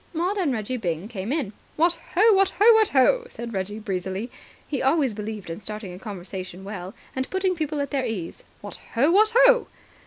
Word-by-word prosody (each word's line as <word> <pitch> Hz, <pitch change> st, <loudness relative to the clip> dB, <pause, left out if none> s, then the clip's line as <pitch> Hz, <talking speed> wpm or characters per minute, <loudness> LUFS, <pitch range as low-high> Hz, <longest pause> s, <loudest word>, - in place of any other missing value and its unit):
Maud 355 Hz, +5 st, 0 dB
and 335 Hz, -7 st, +1 dB
Reggie 235 Hz, +1 st, -2 dB
Byng 175 Hz, -3 st, -3 dB
came 205 Hz, 0 st, -4 dB
in. 275 Hz, -9 st, -1 dB, 0.2 s
"What 335 Hz, +2 st, +3 dB, 0.2 s
ho, 430 Hz, +4 st, +6 dB
what 390 Hz, -1 st, +4 dB
ho, 415 Hz, -, +4 dB
what 440 Hz, -1 st, +4 dB
ho!" 470 Hz, -, +4 dB
said 235 Hz, -, -7 dB
Reggie 195 Hz, +2 st, -3 dB
breezily. 195 Hz, +2 st, -4 dB, 0.4 s
He 280 Hz, -, -2 dB
always 270 Hz, -3 st, +2 dB
believed 210 Hz, -4 st, -6 dB
in 165 Hz, -, -6 dB
starting 210 Hz, -2 st, -6 dB
a 180 Hz, -, -9 dB
conversation 185 Hz, -2 st, -7 dB
well, 195 Hz, -1 st, -7 dB, 0.2 s
and 260 Hz, 0 st, -2 dB
putting 380 Hz, -1 st, +1 dB
people 310 Hz, -3 st, -2 dB
at 280 Hz, -, -3 dB
their 275 Hz, -2 st, 0 dB
ease. 190 Hz, -7 st, -5 dB, 0.2 s
"What -, -, -6 dB, 0.2 s
ho! 275 Hz, +8 st, +4 dB
What 430 Hz, +4 st, +5 dB
ho!" -, -, +5 dB
235 Hz, 195 wpm, -24 LUFS, -, 0.4 s, ho